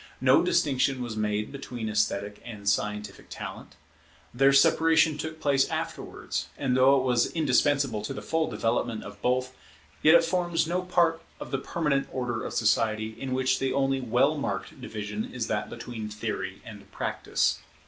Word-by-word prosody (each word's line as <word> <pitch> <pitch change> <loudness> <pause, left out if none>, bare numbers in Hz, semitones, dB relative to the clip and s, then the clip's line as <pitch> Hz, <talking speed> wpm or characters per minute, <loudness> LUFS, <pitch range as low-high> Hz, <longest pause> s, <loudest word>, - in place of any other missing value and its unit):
No - - +5
distinction 130 -1 +1
was 120 -3 -5
made 105 0 -1
between 125 -5 -6
esthetic 105 -1 -1
and 105 -4 -9
scientific 105 0 -1
talent. - - -8 0.6
Their 135 +3 +5
separation 160 +3 +4
took 160 +1 -6
place 140 -3 +2
afterwards: - - -4
and 130 -3 0
though 130 +2 +6
it - - -1
was 125 -2 +2
indispensable 140 -6 +2
to - - -4
the - - -7
full 160 -1 0
development 115 0 -1
of 100 0 -11
both, 130 +1 0 0.5
yet 155 +2 +7
it 170 - +6
forms 175 -1 0
no 175 +3 -1
part 170 -2 +2 0.2
of - - -8
the 135 - 0
permanent 140 -2 -1
order 125 -3 -3
of - - -5
society, 110 -1 +1
in 130 -1 -3
which 130 0 +1
the 135 -1 0
only 135 0 +1
well 125 -3 +2
marked - - -4
division 105 0 -4
is 125 -3 -3
that 105 -1 -2
between 110 -3 -6
Theory 105 -3 -5
and 105 -2 -12
Practice. - - -1
130 Hz, 165 wpm, -27 LUFS, 110-140 Hz, 0.6 s, yet